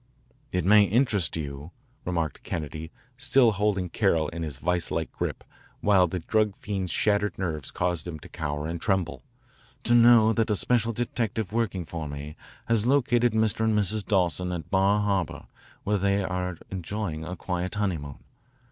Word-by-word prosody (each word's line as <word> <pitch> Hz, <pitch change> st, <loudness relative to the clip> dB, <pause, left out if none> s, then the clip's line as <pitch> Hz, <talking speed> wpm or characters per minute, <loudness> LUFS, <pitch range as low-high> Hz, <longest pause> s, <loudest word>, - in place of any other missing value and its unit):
"It 90 Hz, -2 st, -1 dB
may 105 Hz, +1 st, +7 dB
interest 105 Hz, -, +1 dB
you," 70 Hz, 0 st, -6 dB, 0.4 s
remarked 85 Hz, -5 st, -2 dB
Kennedy, 80 Hz, 0 st, -5 dB, 0.3 s
still 130 Hz, -3 st, +4 dB
holding 100 Hz, -2 st, 0 dB
Carroll 85 Hz, -4 st, +1 dB
in 85 Hz, 0 st, -6 dB
his 75 Hz, -5 st, -4 dB
vise 85 Hz, +3 st, -1 dB
like -, -, -2 dB
grip, -, -, -4 dB, 0.4 s
while 95 Hz, -3 st, +4 dB
the 90 Hz, -, -3 dB
drug 105 Hz, +4 st, +1 dB
fiend's 95 Hz, -4 st, -3 dB
shattered 105 Hz, +1 st, +1 dB
nerves 80 Hz, -7 st, -3 dB
caused 90 Hz, -2 st, -2 dB
him 85 Hz, -3 st, -5 dB
to -, -, -11 dB
cower 75 Hz, -1 st, -4 dB
and 85 Hz, +1 st, -4 dB
tremble, 95 Hz, -3 st, 0 dB, 0.6 s
"to 120 Hz, -, +2 dB
know 115 Hz, -2 st, +7 dB
that 115 Hz, 0 st, +1 dB
a 105 Hz, -, +2 dB
special 115 Hz, +2 st, +2 dB
detective 110 Hz, -3 st, -2 dB
working 105 Hz, -6 st, -1 dB
for 80 Hz, -1 st, -5 dB
me 70 Hz, +2 st, -7 dB, 0.3 s
has 115 Hz, -1 st, +2 dB
located 120 Hz, -3 st, +3 dB
Mr. 110 Hz, 0 st, +1 dB
and 110 Hz, -1 st, +2 dB
Mrs. 105 Hz, +1 st, +1 dB
Dawson 90 Hz, -2 st, +1 dB
at 85 Hz, -4 st, -5 dB
Bar 100 Hz, +2 st, +3 dB
Harbor, 100 Hz, -5 st, -1 dB, 0.4 s
where 105 Hz, 0 st, +1 dB
they 100 Hz, +1 st, +1 dB
are 90 Hz, -2 st, -3 dB
enjoying 90 Hz, -3 st, -4 dB
a 90 Hz, +3 st, -5 dB
quiet 90 Hz, +2 st, -3 dB
honeymoon. 85 Hz, -10 st, -2 dB
95 Hz, 165 wpm, -26 LUFS, 85-110 Hz, 0.6 s, may